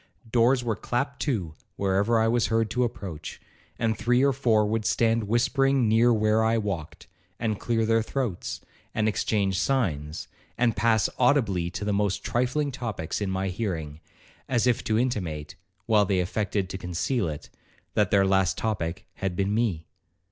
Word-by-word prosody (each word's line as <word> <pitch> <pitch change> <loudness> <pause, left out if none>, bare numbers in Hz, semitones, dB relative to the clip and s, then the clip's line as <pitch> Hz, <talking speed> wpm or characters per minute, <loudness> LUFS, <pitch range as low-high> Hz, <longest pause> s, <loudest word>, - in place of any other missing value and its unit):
Doors 125 +2 +3
were 115 -2 -1
clapped 130 +8 -2
to 100 - -1 0.2
wherever 100 +4 +2
I 110 - +3
was 120 0 +2
heard 115 -1 +1
to 125 - +1
approach; 90 -9 -5 0.4
and 115 -2 0
three 125 +3 +2
or 140 - +3
four 115 -5 +2
would 110 +1 -1
stand 115 +1 +2
whispering 130 +3 +2
near 115 +3 +4
where 110 0 +3
I 115 +1 +2
walked, 100 -8 -4 0.3
and 110 -3 -1
clear 115 -2 0
their 115 0 +3
throats, 115 -5 -3 0.3
and 110 - +1
exchange 100 -3 0
signs, 80 - -1 0.3
and 115 -2 +2
pass 110 -1 +3
audibly 110 -10 +2
to 95 +3 -5
the 105 - 0
most 100 -1 0
trifling 130 +4 0
topics 110 -9 -4
in 100 - -1
my 95 0 -1
hearing, 85 -7 -4 0.5
as 120 -2 +2
if 125 -2 +2
to 110 - +1
intimate, 90 -11 -2 0.3
while 105 -2 +4
they 95 -1 +1
affected 100 +1 -1
to 95 - -5
conceal 90 +4 -1
it, 75 -1 -8 0.4
that 105 -3 +2
their 100 0 +4
last 95 -1 +2
topic 95 -3 -2
had 95 -2 -2
been 100 +2 0
me. 105 -8 0
110 Hz, 165 wpm, -26 LUFS, 95-120 Hz, 0.5 s, near